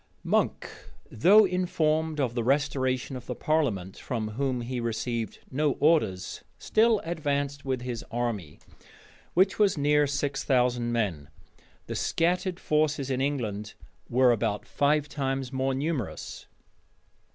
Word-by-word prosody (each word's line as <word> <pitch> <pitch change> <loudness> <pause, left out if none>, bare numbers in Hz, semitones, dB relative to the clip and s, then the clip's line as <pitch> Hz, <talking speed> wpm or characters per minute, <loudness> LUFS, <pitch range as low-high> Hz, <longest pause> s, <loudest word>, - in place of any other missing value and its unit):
Monk, - - 0 0.4
though 200 - +6
informed 160 -4 0
of 125 -4 0
the 120 -1 -1
restoration 130 0 0
of 125 -1 -8
the - - -3
parliament, 115 - -1
from 110 -4 -3
whom 130 +2 -1
he 125 +1 -4
received 115 0 -3
no 145 +1 +1
orders, 145 - +1
still 220 0 +3
advanced 145 -4 -2
with 130 -2 -2
his 120 -2 -4
army, 115 -10 -3 0.8
which 190 +3 +3
was 200 -5 +3
near 145 0 +3
six 140 0 -2
thousand 125 -2 +1
men: 95 -11 -1 0.6
the - - -5
scattered 180 +2 0
forces 150 -3 0
in 130 0 0
England 110 -7 -2 0.3
were 125 +1 +5
above 105 -2 -1
five 150 +1 +1
times 135 -2 -3
more 130 0 0
numerous. 140 - -4
135 Hz, 130 wpm, -27 LUFS, 120-155 Hz, 0.8 s, though